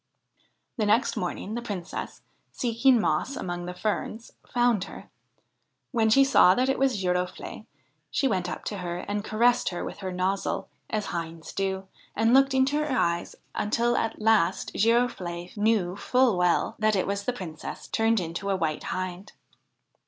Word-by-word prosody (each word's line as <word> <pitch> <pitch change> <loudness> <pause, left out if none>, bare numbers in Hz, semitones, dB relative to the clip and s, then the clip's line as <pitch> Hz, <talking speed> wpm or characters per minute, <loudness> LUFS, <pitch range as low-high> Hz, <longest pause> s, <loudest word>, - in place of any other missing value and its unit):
The 215 -3 +1
next 225 +5 +3
morning 185 +3 -3
the 240 - -3
Princess, 190 -6 -6 0.3
seeking 245 +1 +3
moss 265 +5 0
among 175 -1 -4
the 180 - -5
ferns, 215 +3 -3 0.2
found 240 -5 +2
her. - - -11 0.8
When 225 -4 +2
she 275 +5 +6
saw 190 -8 +6
that 255 +1 +1
it 270 - +1
was 265 -6 +2
Girofle'e, 180 0 -2 0.4
she 275 - +1
went 185 -7 0
up - - -6
to 205 - -3
her 175 -1 -3
and 205 0 -2
caressed 235 +3 +2
her 175 - -4
with - - -7
her 190 -2 -4
nozzle, 185 +2 -1 0.2
as 215 -1 -1
hinds 165 -1 -5
do, 190 -1 -2 0.3
and 225 +2 +3
looked 270 0 +5
into 265 +3 +3
her 300 - -3
eyes 170 0 0 0.2
until 235 +3 +1
at 225 - -1
last 215 -4 +2
Girofle'e 200 -7 0
knew 205 -4 +1
full 250 +1 +2
well 180 -1 +2
that 215 -1 +3
it 190 - +1
was 200 0 -2
the - - +1
Princess 165 -9 -7
turned 225 0 +2
into 175 +3 -4
a 195 - +2
White 160 -4 -2
Hind. 185 +1 -4
205 Hz, 165 wpm, -27 LUFS, 180-235 Hz, 0.8 s, she